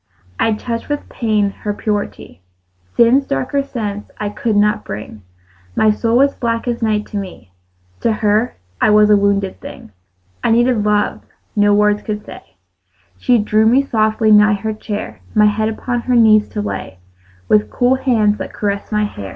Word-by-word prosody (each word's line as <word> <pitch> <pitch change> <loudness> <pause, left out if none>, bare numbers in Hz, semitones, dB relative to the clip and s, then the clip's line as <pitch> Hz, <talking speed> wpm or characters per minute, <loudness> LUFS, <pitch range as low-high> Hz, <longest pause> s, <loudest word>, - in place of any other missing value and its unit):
I 225 - +2
touched 230 +3 -5
with 290 0 -3
pain 215 -4 0
her 205 -1 -3
purity; 205 - -4 0.6
Sin's 255 +4 +4
darker 135 - -1
sense 210 -7 -5
I 210 - -3
could 215 +1 -2
not 210 +1 +2
bring: 105 +1 -8 0.5
My 215 - +4
soul 230 +2 0
was 275 +2 +3
black 230 0 -2
as 240 0 -2
night 215 -2 0
to 210 - -5
me: 185 - -8 0.5
To 230 - +1
her 215 +2 0 0.3
I - - +4
was 210 0 +5
a - - +7
wounded 200 -1 0
thing. - - -11 0.5
I - - +1
needed 235 -1 +2
love 210 0 0 0.3
no 205 -1 +4
words 210 0 +2
could 210 -1 -5
say; 90 - -13 0.6
She 245 - +3
drew 215 0 +2
me 260 +5 +4
softly 220 -2 +1
nigh 210 0 +6
her 220 +2 -3
chair, 215 -1 -6
My 210 0 +5
head 215 +1 +1
upon 240 +2 -3
her 250 +1 0
knees 215 -2 +5
to 210 - -4
lay, 95 - -5 0.5
With 105 +1 +3
cool 245 - +2
hands 225 -6 +1
that - - -6
caressed 200 0 -3
my 210 0 +1
hair. 100 - -6
215 Hz, 175 wpm, -17 LUFS, 205-230 Hz, 0.6 s, a